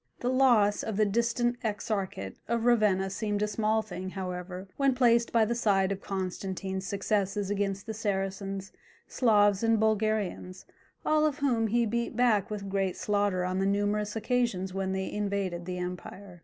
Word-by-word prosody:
The 245 - 0
loss 240 -6 +4
of 215 -3 -4
the 215 - +4
distant 235 +3 +1
exarchate 200 - -3
of 235 -1 0
Ravenna 210 -5 +3
seemed 205 0 -1
a - - +1
small 215 +1 +1
thing, 185 -3 -6
however, 185 0 -5
when 275 -2 +2
placed 235 -2 +3
by 230 -2 +4
the 235 - 0
side 200 -5 +2
of 195 0 -3
Constantine's 190 0 -4
successes 200 0 -1
against 200 -1 -1
the 220 - -4
Saracens, 195 -2 -3 0.4
Slavs, 205 -5 +3
and 225 -1 +3
Bulgarians, 215 -4 -1 0.4
all 310 0 +3
of 295 -2 -2
whom 245 -6 +1
he 235 +2 +2
beat 235 +1 -2
back 230 -5 +3
with 205 -2 -5
great 195 -1 -1
slaughter 205 -3 0
on 185 +1 -1
the 195 - +1
numerous 205 +1 0
occasions 225 -5 0
when 190 0 -2
they 190 0 -2
invaded 200 -4 -2
the 180 0 -3
empire. 180 +1 -7
205 Hz, 165 wpm, -29 LUFS, 190-225 Hz, 0.4 s, loss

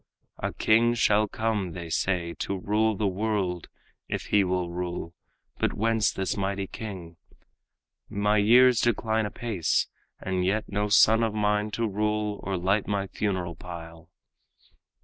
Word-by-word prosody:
"A - - -2
king 115 +2 +3
shall 105 -2 +3
come, 105 -5 -2
they 85 -2 -7
say, 85 0 0
to 100 - -2
rule 105 +3 +1
the 105 - 0
world, 95 -3 -1 0.4
If - - -3
he 105 -1 +6
will 90 -1 -1
rule; 85 -1 -4 0.5
but - - +1
whence 110 -1 +1
this 95 -1 -2
mighty 100 0 -2
king? 90 -6 -8 0.9
My 105 +1 +1
years 120 +3 +6
decline 110 -1 +1
apace, 105 -6 0 0.3
and 95 -1 -2
yet 105 +4 +1
no 105 +1 -1
son 110 +2 +6
Of 110 -2 0
mine 105 0 +1
to 115 -1 0
rule 105 0 -1
or 95 -1 -2
light 95 +4 +1
my 100 -1 -1
funeral 95 -3 -2
pile." 85 -1 -10
100 Hz, 145 wpm, -27 LUFS, 90-110 Hz, 0.9 s, he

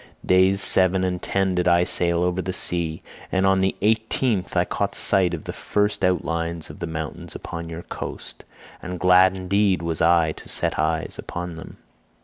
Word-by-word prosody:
Days 95 +2 +4
seven 95 0 +3
and 90 -1 -2
ten 95 -1 0
did 90 0 0
I 85 0 +4
sail 85 -1 +1
over 90 +1 0
the 95 +1 -4
sea, 85 -4 0 0.3
and 95 0 +1
on 95 0 +3
the 95 0 +1
eighteenth 110 -1 0
I - - +3
caught - - -2
sight 90 -3 +2
of 80 - -9
the - - -6
first 105 -1 -1
outlines 85 -2 -1
of - - -14
the 85 - -4
mountains 80 -2 -6
upon 85 -1 -7
your 85 +1 -7
coast—and 90 -1 -9
glad 95 0 +5
indeed 95 0 +1
was 85 -1 -2
I 85 -1 +4
to - - -10
set - - -1
eyes 80 +1 -1
upon 90 -1 -6
them. 80 - -11
90 Hz, 175 wpm, -23 LUFS, 85-95 Hz, 0.3 s, glad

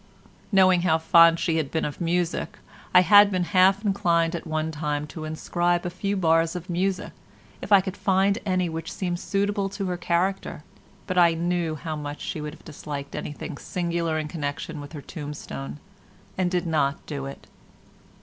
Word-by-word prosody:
Knowing 185 -3 +5
how 165 -3 +3
fond 165 +1 +6
she 165 -1 0
had 155 -4 -1
been 160 - -1
of 150 - -5
music 175 0 -1 0.3
I 180 - +7
had 205 +3 +7
been 185 -2 0
half 190 +3 +3
inclined 170 -4 +2
at 170 - -6
one 155 0 -1
time 150 -1 -2
to 155 -2 -6
inscribe 175 +3 -1
a 175 - -2
few 200 +2 -2
bars 165 -1 +2
of 180 +1 -6
music, 185 +2 -1 0.5
if - - -8
I 200 -1 +8
could 190 0 -5
find 195 +1 +2
any 185 -2 0
which 165 0 -5
seemed 175 -2 -3
suitable 200 0 -1
to 195 0 -4
her 180 -1 -2
character, 175 -2 -1 0.4
but 185 0 0
I 170 -1 +5
knew 170 -1 -1
how 155 +2 -5
much 145 -1 -6
she 155 - -4
would 150 +1 -6
have - - -21
disliked 145 -2 -7
anything 145 -1 -6
singular 170 -2 -2
in 155 -1 -2
connection 150 0 -4
with 145 +2 -10
her 150 - -7
tombstone 145 -2 -7 0.6
and 185 -2 +1
did 180 0 -1
not 155 -3 0
do 140 -2 -5
it. 135 - -10
170 Hz, 180 wpm, -25 LUFS, 155-185 Hz, 0.6 s, I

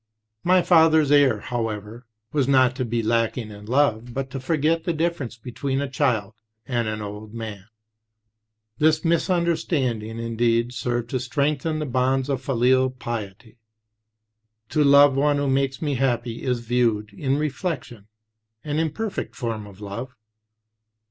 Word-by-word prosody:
"My 180 0 +4
father's 160 -4 +5
error, 135 -7 +4
however, 115 0 -4 0.2
was 140 -4 +1
not 130 -2 +4
to 130 - -1
be 115 0 -1
lacking 115 0 0
in 105 0 -11
love, 120 -2 +1
but 135 -1 -3
to 135 - -4
forget 155 +4 +1
6 165 - -27
the 170 - +2
difference 155 -7 -2
between 130 +3 -3
a 140 - -1
child 125 -7 0 0.3
and 120 -3 -1
an 110 0 -3
old 105 +2 -8
man." 110 -4 -6 1.1
The 155 +1 +4
mis 170 +2 +1
understanding, 140 -11 0
indeed, 115 +1 0
served 120 -1 -2
to 130 - 0
strengthen 145 +4 -1
the 155 - -2
bonds 130 +1 0
of 135 -2 -1
filial 130 0 +2
piety. 115 -3 -7 1.1
"To 150 - +2
love 140 -1 +7
one 145 +1 +2
who 145 0 0
makes 135 +1 0
me 145 -2 0
happy, 120 -3 -1
is, 125 -2 -1
viewed 115 -3 0
in 135 +5 -1
reflection, 140 - -4 0.6
an 150 +1 -2
imperfect 165 +7 -3
form 115 -4 -4
of 100 0 -14
love. 115 +6 -6
130 Hz, 150 wpm, -23 LUFS, 115-145 Hz, 1.1 s, love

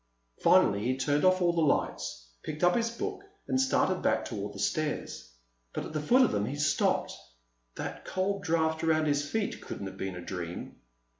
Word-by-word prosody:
Finally 100 0 +5
he 130 +2 0
turned 145 +3 +1
off 185 0 +4
all 175 -1 +3
the 170 - +1
lights, - - -1
picked 155 +3 -5
up 175 0 +5
his 235 -1 +1
book, 395 - -4 0.3
and 260 - +2
started 265 - +2
back - - +1
toward - - -4
the - - -11
stairs. 150 - -2 0.4
But - - -3
at - - -8
the 155 - -1
foot 250 - +5
of - - +3
them 105 0 0
he 140 - -3
stopped. 150 +1 +1 0.6
That - - -5
cold 195 +1 -1
draft 160 -3 0
around 155 -1 +3
his 145 -1 0
feet 220 +3 -2
couldn't 100 - -6
have 95 - -7
been 95 -1 -4
a 90 - -6
dream. 90 -2 -6
155 Hz, 195 wpm, -30 LUFS, 130-185 Hz, 0.6 s, Finally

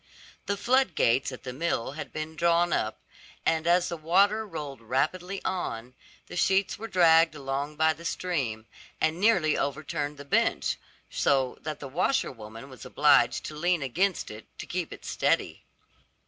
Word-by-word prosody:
The 200 - 0
floodgates 195 - +2
at 130 - -9
the 125 -2 -5
mill 135 -4 -1
had 150 - -7
been 155 +1 -5
drawn 170 +2 +2
up, 110 - -1 0.4
and 160 0 +1
as 175 +1 +4
the 170 - -4
water 200 +7 +3
rolled 145 - -6
rapidly 165 - -2
on, 125 -10 -3 0.3
the - - -10
sheets 195 +2 +2
were 225 - -5
dragged 165 -4 +5
along 140 +1 -3
by 160 +1 +3
the 165 - -13
stream, 135 -12 -2 0.3
and 160 +2 +1
nearly 185 -8 +3
overturned 145 0 -2
the 145 - -9
bench, 140 - +1 0.3
so 135 -2 +1
that 155 -1 -5
the 140 - -7
washer 175 - 0
woman 115 +1 -10
was 130 -4 -12
obliged - - +3
to 155 - -6
lean 175 0 +1
against 180 - 0
it 105 0 -11
to - - -6
keep - - -3
it - - -10
steady. - - 0
155 Hz, 160 wpm, -28 LUFS, 135-180 Hz, 0.4 s, dragged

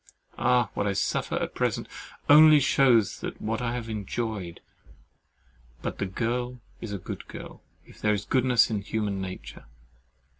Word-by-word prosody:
Ah! 125 -4 +2
what 100 - -1
I 100 - +1
suffer - - -1
at - - -2
present - - -1 0.4
only 155 +1 +8
shews 130 -6 +3
what 115 +2 -3
I 120 -1 -1
have 120 -2 -5
enjoyed. 105 -3 -4 1.2
But - - -4
"the 100 - -1
girl 120 +5 -2 0.2
is 115 - -6
a 100 - -3
good 90 - -8
girl, - - -10 0.2
if - - -17
there 105 - +2
is 100 0 -5
goodness 125 -3 +3
in 105 -2 -1
human 100 -2 -2
nature." 95 -1 -8
115 Hz, 150 wpm, -27 LUFS, 100-125 Hz, 1.2 s, only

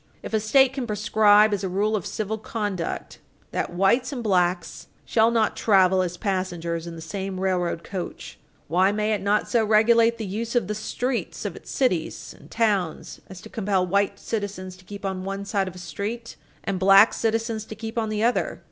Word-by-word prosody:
If - - -7
a 220 - +3
State 255 +5 +4
can 265 -3 -4
prescribe, 210 0 +4
as 200 -1 -2
a 190 - -1
rule 205 +4 0
of 195 - -3
civil 220 +1 -3
conduct, 205 -6 -4 0.3
that - - -2
whites 195 +9 +2
and 250 -4 -4
blacks 180 -3 0 0.2
shall 225 0 +3
not 225 -2 +1
travel 190 -3 +4
as 180 -1 -3
passengers 175 -4 -2
in 170 - -7
the 165 - -8
same 190 +2 -5
railroad 180 -3 -1
coach, 185 -3 -7 0.3
why 185 +5 +3
may 210 +1 0
it 210 - -1
not 205 +1 +1
so 235 -2 +2
regulate 230 +2 +4
the 220 - -4
use 225 +5 -4
of 240 - +2
the 210 - -2
streets 240 +4 -3
of - - -3
its - - -12
cities 185 -12 -1
and - - -17
towns 205 -7 -1
as 190 -2 -10
to - - -11
compel 195 -5 0
white 200 +2 +1
citizens 195 -4 -5
to 185 - -19
keep 200 +1 -8
on 190 -1 -3
one 195 +1 -4
side 195 -1 0
of 185 - -7
a - - -10
street 200 +8 -5 0.3
and 195 -2 -2
black 195 +3 +7
citizens 225 -1 -1
to 220 - -8
keep 225 +2 -7
on 225 -2 -1
the 215 0 -1
other? 240 +2 0
205 Hz, 200 wpm, -24 LUFS, 185-220 Hz, 0.3 s, black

